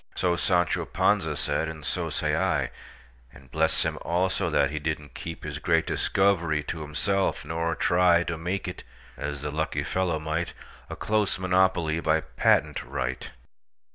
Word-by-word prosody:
So 90 -2 +1
Sancho 85 0 +1
Panza - - +1
said, 80 - -1
and 80 -2 -8
so - - -2
say - - 0
I:And 60 0 -4
bless - - +1
him, - - -2
also, 90 +2 0
that 70 - +2
he 75 - -2
did 80 +1 -1
n't 75 -1 -15
keepHis 75 -3 -6
great 80 0 +2
discovery 85 -6 +1
to 80 +2 -5
himself; 95 +6 -1
nor 80 0 -1
tryTo 85 -2 +3
make 90 +4 -2
it—as 70 +3 -7
the 75 - -2
lucky 80 +2 -1
fellow 90 -4 0
might—A 80 +2 -5
close 105 -1 0
monopoly 90 -3 +2
by 80 -1 +2
patent - - +2
right! 65 0 -3
80 Hz, 140 wpm, -27 LUFS, 75-90 Hz, -, tryTo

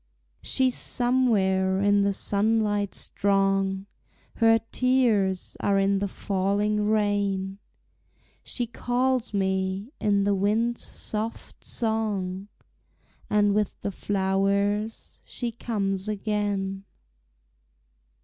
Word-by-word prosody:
She's 260 -1 +2
somewhere 195 -7 +1
in 205 0 +3
the 200 0 +2
sunlight 205 0 0
strong, 195 -1 0 0.5
Her 225 -1 +5
tears 230 -8 +1
are 200 -1 +2
in 195 0 +2
the 200 - -1
falling 205 +2 0
rain, 200 -2 0 0.8
She 245 - -3
calls 245 +1 0
me 190 +2 -1
in 200 -1 +2
the 200 0 +2
wind's 220 +5 +1
soft 220 +1 -5
song, 205 -4 -2 0.8
And 205 -1 +3
with 210 -1 -1
the 200 - -2
flowers 200 +3 -1
she 240 -2 -4
comes 200 -4 -2
again. 200 -2 -2
205 Hz, 90 wpm, -26 LUFS, 195-220 Hz, 0.8 s, Her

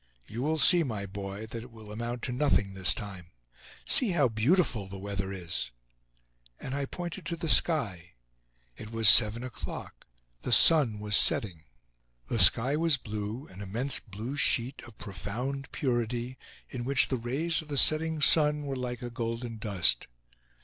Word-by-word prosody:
You 115 - -7
will 155 +4 0
see, 175 +2 +6
my 110 -9 -4
boy, 100 +2 -7
that 115 +1 -7
it 125 - -12
will 110 -3 -13
amount 120 +2 -5
to - - -3
nothing 125 -7 +1
this 95 0 +1
time. 100 -6 -8 0.6
See 250 - +3
how 145 -7 +2
beautiful 115 - +1
the 95 +1 -9
weather 95 0 -5
is!" 85 -9 -4 0.9
And 135 - -6
I 140 0 -2
pointed 175 +5 -7
to 170 - -3
the 170 0 -5
sky. 105 - +1 0.6
It 110 - -10
was 115 -2 +2
seven 115 +2 +7
o'clock; 125 - -8 0.3
the - - -5
sun 135 -5 +5
was 105 0 -1
setting. 85 -9 +1 0.6
The 115 - 0
sky 120 +9 +7
was 160 -2 +2
blue, 110 +3 -6
an 95 +2 -12
immense 115 +8 -2
blue 110 +6 -7
sheet 130 -1 +1
of 110 -2 -16
profound 120 +8 -5
purity, 120 -1 -3 0.3
in 125 -2 -6
which 135 +1 +2
the 130 - -1
rays 140 +9 -2
of 155 - -14
the 145 -2 -4
setting 155 +2 +3
sun 150 -1 +3
were 140 -1 -4
like 125 0 -5
a 120 - -6
golden 115 0 -5
dust. 100 -6 0
120 Hz, 165 wpm, -28 LUFS, 105-140 Hz, 0.9 s, seven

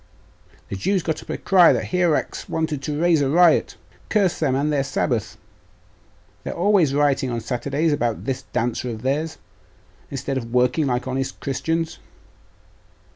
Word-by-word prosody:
'The - - -4
Jews 190 - 0
got 160 - -2
up - - -17
a - - -2
cry 185 -3 +5
that - - -1
Hierax 175 -4 0
wanted 155 -3 -2
to 145 +1 -3
raise 170 -2 +3
a 135 - +1
riot. 170 +3 +4 0.3
Curse 200 -5 +1
them 135 -5 +1
and 150 +3 0
their 140 -2 +1
sabbath, 130 -4 -2 1.1
they - - -5
are - - -4
always 175 -6 +3
rioting 145 -2 +2
on 120 -1 -2
Saturdays 140 +7 -1
about 120 -5 -1
this 130 0 -2
dancer 125 +1 -1
of 110 -1 -6
theirs, 150 +5 -1 0.7
instead 135 0 -3
of 115 -2 -9
working 125 +5 +2
like 125 0 -1
honest 135 +1 -3
Christians! 160 +4 -2
140 Hz, 160 wpm, -22 LUFS, 130-160 Hz, 1.1 s, cry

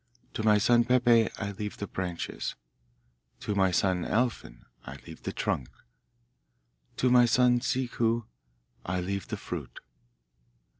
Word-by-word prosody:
To - - -3
my 105 -1 +4
son 120 +3 +4
Peppe 120 -2 +4
I 100 -2 -3
leave 105 +1 -6
the 100 - -4
branches. 90 -3 -4 0.9
To 105 - -2
my 95 -2 +3
son 90 0 +1
Alfin 115 - -2 0.2
I 65 - -8
leave 80 -1 -11
the - - -4
trunk. 65 - -2 1.3
To 125 - +2
my 125 -1 +7
son 125 +1 +4
Ciccu 120 -3 0 0.6
I 90 +1 -2
leave 100 +2 -3
the - - -4
fruit. - - -7
110 Hz, 135 wpm, -28 LUFS, 95-120 Hz, 1.3 s, my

